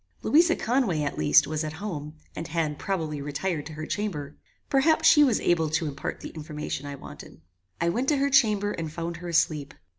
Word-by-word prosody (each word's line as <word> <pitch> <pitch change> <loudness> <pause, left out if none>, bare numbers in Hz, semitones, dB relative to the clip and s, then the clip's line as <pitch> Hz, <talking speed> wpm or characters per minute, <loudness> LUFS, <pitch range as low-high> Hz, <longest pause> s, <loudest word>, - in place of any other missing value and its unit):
Louisa 335 +3 +4
Conway, 225 - 0
at 140 - -2
least, 75 -1 +5
was 155 0 -2
at 155 0 -4
home 160 -5 -6 0.2
and 160 - -5
had, 155 -1 -2
probably, 160 -7 -2
retired 150 +2 -3
to 160 - -9
her 155 +1 -6
chamber; 160 -9 -4 0.3
perhaps 295 +4 +3
she 295 -2 +7
was 255 -7 +3
able 165 -3 +1
to 160 +1 0
impart 140 -1 -5
the - - -6
information 150 -2 -6
I 140 - -5
wanted. - - -12 0.4
I 170 - +1
went 245 +9 -1
to 295 - +3
her 280 +1 +1
chamber, 210 -5 +3
and 160 -5 -4
found 170 +1 -4
her 175 +1 -8
asleep. 155 -4 0
165 Hz, 200 wpm, -26 LUFS, 150-210 Hz, 0.4 s, she